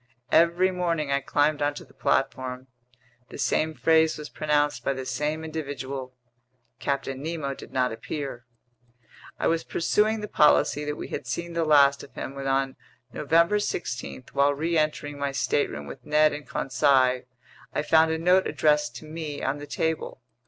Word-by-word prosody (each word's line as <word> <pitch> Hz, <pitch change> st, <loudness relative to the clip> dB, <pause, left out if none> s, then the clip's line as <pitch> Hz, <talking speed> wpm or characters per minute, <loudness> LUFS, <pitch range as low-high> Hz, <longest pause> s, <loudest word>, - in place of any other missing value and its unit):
Every 170 Hz, +3 st, +4 dB
morning 170 Hz, -5 st, -1 dB
I 140 Hz, -, +3 dB
climbed 145 Hz, +2 st, +1 dB
onto 145 Hz, 0 st, -1 dB
the -, -, -22 dB
platform. 130 Hz, -1 st, -1 dB, 0.6 s
The -, -, -9 dB
same 155 Hz, 0 st, 0 dB
phrase 160 Hz, 0 st, +3 dB
was 150 Hz, 0 st, -8 dB
pronounced 150 Hz, -1 st, 0 dB
by 140 Hz, -, +1 dB
the 130 Hz, -1 st, -6 dB
same 150 Hz, +5 st, -2 dB
individual. 140 Hz, -4 st, -5 dB, 0.6 s
Captain 135 Hz, -1 st, -2 dB
Nemo 155 Hz, -3 st, -3 dB
did -, -, -12 dB
not 125 Hz, -1 st, +1 dB
appear. 120 Hz, 0 st, -6 dB, 0.9 s
I -, -, -2 dB
was 165 Hz, 0 st, +1 dB
pursuing 215 Hz, +5 st, +1 dB
the 210 Hz, -, -4 dB
policy 150 Hz, -3 st, +3 dB
that 150 Hz, 0 st, -2 dB
we -, -, -7 dB
had -, -, -5 dB
seen 170 Hz, 0 st, -4 dB
the 165 Hz, -1 st, 0 dB
last 140 Hz, -2 st, +5 dB
of -, -, -14 dB
him, 135 Hz, -, -5 dB
when 135 Hz, 0 st, -5 dB
on 135 Hz, 0 st, 0 dB, 0.4 s
November 170 Hz, +7 st, +3 dB
16, 130 Hz, -, -4 dB
while 140 Hz, +1 st, +3 dB
reentering 155 Hz, -2 st, -1 dB
my 140 Hz, 0 st, -1 dB
stateroom 135 Hz, -, -1 dB
with -, -, -10 dB
Ned 150 Hz, 0 st, +3 dB
and 145 Hz, 0 st, -7 dB
Conseil, 130 Hz, -1 st, +2 dB, 0.5 s
I -, -, -1 dB
found 160 Hz, +1 st, +4 dB
a 160 Hz, -, 0 dB
note 180 Hz, +3 st, +3 dB
addressed 150 Hz, -1 st, +1 dB
to -, -, -9 dB
me 155 Hz, -2 st, -6 dB
on 135 Hz, +2 st, -1 dB
the 145 Hz, -, -8 dB
table. 160 Hz, -6 st, -2 dB
150 Hz, 165 wpm, -26 LUFS, 135-160 Hz, 0.9 s, last